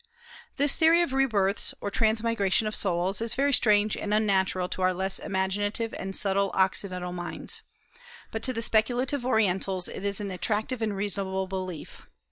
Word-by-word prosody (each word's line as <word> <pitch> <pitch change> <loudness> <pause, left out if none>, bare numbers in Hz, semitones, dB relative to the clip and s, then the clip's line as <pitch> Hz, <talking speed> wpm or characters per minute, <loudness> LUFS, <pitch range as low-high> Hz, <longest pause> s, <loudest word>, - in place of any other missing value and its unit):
This 285 0 +4
theory 330 +2 +5
of 280 - -3
re 270 0 +3
births, 200 -3 0
or 205 - -4
transmigration 220 -2 +1
of 215 - -2
souls, 190 +1 0
is 230 -1 -1
very 280 +1 +2
strange 210 -3 +4
and 210 0 -1
unnatural 190 -3 +1
to - - -5
our 185 0 +2
less 190 +1 -1
imaginative 205 +4 -1
and 195 0 -5
subtile 200 0 +1
Occidental 185 -1 0
minds; 175 -1 -5 0.7
but 225 - -4
to 260 - +1
the 230 -2 -1
speculative 245 +4 +1
Orientals 190 -5 +1
it - - -7
is 200 -1 0
an 200 -2 -4
attractive 215 +7 -2
and 215 -3 -1
reasonable 195 -1 -2
belief. 185 -4 -7
200 Hz, 165 wpm, -27 LUFS, 190-225 Hz, 0.7 s, theory